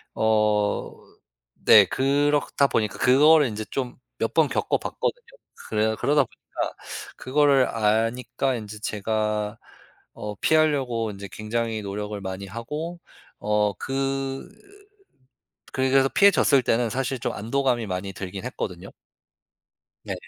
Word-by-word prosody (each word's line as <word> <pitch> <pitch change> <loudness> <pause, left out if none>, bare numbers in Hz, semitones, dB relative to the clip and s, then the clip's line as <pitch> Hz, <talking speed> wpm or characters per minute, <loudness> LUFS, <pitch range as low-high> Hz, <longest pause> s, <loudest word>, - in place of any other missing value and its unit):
어 105 -1 +1 0.7
네 - - +9
그렇다 140 +1 +2
보니까 110 -4 -1
그거를 150 +3 +6
인제 110 -1 -5
좀 125 -3 -3 0.2
몇 115 - -1
번 160 -2 +4
겪어봤거든요. - - -2 0.5
그래 110 0 +1
그러다 145 0 +3
보니까 - - -6 0.4
그거를 140 -1 +3
아니까 115 +4 0
인제 105 -2 -7
제가 105 0 -2 0.6
어 105 0 -6
피하려고 135 -6 +1
인제 100 0 -8
굉장히 110 +3 -3
노력을 105 +1 -5
많이 95 +1 -5
하고 150 - -6 0.4
어 105 -1 +1
그 135 0 -2 1.3
그렇게 130 0 +1
해서 135 0 +3
피해졌을 190 -9 +5
때는 115 0 +1
사실 130 +2 -2
좀 - - -2
안도감이 120 0 0
많이 95 0 -4
들긴 95 +2 -6
했거든요. 95 -7 -5 1.1
네. - - -4
115 Hz, 255 characters per minute, -24 LUFS, 105-135 Hz, 1.3 s, 네